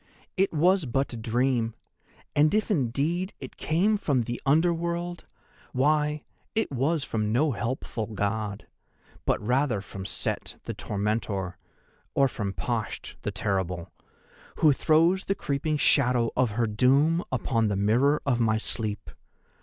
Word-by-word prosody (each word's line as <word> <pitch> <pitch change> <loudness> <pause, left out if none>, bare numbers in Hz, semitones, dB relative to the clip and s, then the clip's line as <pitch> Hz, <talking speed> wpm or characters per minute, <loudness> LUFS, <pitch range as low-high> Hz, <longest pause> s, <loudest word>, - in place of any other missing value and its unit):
It 195 0 +2
was 175 +1 +3
but 135 +2 -1
a - - -4
dream, 115 0 0 0.6
and 150 +1 +5
if 215 +1 +1
indeed 160 - 0
it - - -9
came 195 +7 +2
from 140 -10 +1
the 120 +1 -4
Under 160 +5 +4
World, 170 +1 -3 0.5
why, 150 +3 +1 0.3
it 220 -6 +1
was 140 +4 0
from 110 -4 -1
no 145 +6 +2
helpful 115 -2 -3
God, 105 -1 -2 0.6
but - - +2
rather 125 -1 +2
from 95 -1 -7
Set, - - -3
the - - -4
Tormentor; 100 -3 -2 0.6
or 140 - +5
from 105 -6 -3
Pasht, 115 +2 -3
the - - -2
Terrible, 90 -4 -2 0.6
who 155 -3 +5
throws 165 +7 +3
the 195 - 0
creeping 150 -1 -1
shadow 125 -4 +3
of 125 -2 +2
her 120 - +3
doom 135 +10 +3
upon 115 -3 +1
the 100 - 0
mirror 120 +9 +2
of 125 -4 +1
my 110 -2 +2
sleep. 110 -2 -2
130 Hz, 140 wpm, -27 LUFS, 110-155 Hz, 0.6 s, and